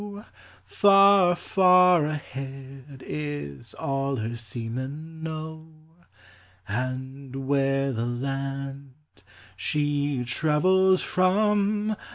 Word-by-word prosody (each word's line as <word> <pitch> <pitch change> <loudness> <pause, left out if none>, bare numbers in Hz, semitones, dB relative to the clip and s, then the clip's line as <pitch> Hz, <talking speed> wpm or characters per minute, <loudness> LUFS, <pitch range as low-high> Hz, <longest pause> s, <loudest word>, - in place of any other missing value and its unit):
Far, 195 - +5
far 180 -3 +4
ahead, 135 -2 -8
is 145 - -6
all 135 0 -2
her 115 0 -4
seamen 130 +8 -7
know. 160 0 -6 1.0
And 130 +4 -5
where 135 0 +1
the 115 0 -2
land 135 +1 -5 0.6
she 145 -3 -1
travels 185 +9 +2
from 210 +3 +1
140 Hz, 75 wpm, -25 LUFS, 135-175 Hz, 1.0 s, Far